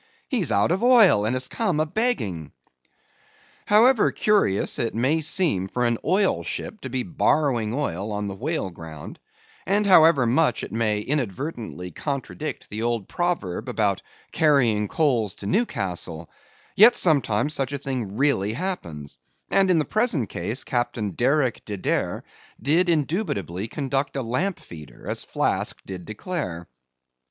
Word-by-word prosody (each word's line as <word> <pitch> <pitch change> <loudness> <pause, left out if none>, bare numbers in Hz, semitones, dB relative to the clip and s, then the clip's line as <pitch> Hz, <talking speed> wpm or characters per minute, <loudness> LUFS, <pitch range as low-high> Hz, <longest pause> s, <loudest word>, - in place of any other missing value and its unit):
He's 200 - 0
out 100 +7 +2
of 185 - 0
oil, 230 - +6
and 120 - 0
has 130 0 0
come 185 -9 -1
a 155 - +2
begging." 110 - -1 1.1
However 225 +3 +5
curious 205 - +1
it 115 -2 -1
may 135 +8 +1
seem 155 - +1
for 125 +5 -1
an 120 -1 +1
oil 190 +4 +2
ship 215 - -5
to 130 - -6
be 130 0 -2
borrowing 140 -8 +1
oil 105 - -3
on 105 0 -3
the 100 - -4
whale 120 - -2
ground, 80 -3 -10 0.5
and 205 +2 +2
however 160 -8 +6
much 135 +7 +2
it - - -6
may 105 -2 0
invertedly 120 - -4
contradict 145 - -5
the 105 +2 -4
old 115 -4 -1
proverb 165 - -2
about 105 -6 0 0.3
carrying 120 -9 +3
coals 120 - 0
to - - -9
Newcastle, 90 - -2 0.4
yet 230 +4 +8
sometimes 145 - +2
such 135 -2 -2
a 140 - -2
thing 125 -7 -4
really 120 -7 +1
happens; 85 - -5 0.3
and 195 -1 +4
in 180 - +4
the 155 - +1
present 215 - 0
case 110 +9 -3
Captain 120 -4 -2
Derick 130 - +1
De 105 -2 -5
Deer - - -1 0.4
did 170 +6 +2
indubitably 140 - -1
conduct 135 +2 -2
a 135 - -2
lamp 165 +12 -1
feeder 75 -4 -12
as - - -1
Flask - - -1
did 90 -2 -7
declare. 105 - -5
130 Hz, 145 wpm, -24 LUFS, 105-165 Hz, 1.1 s, yet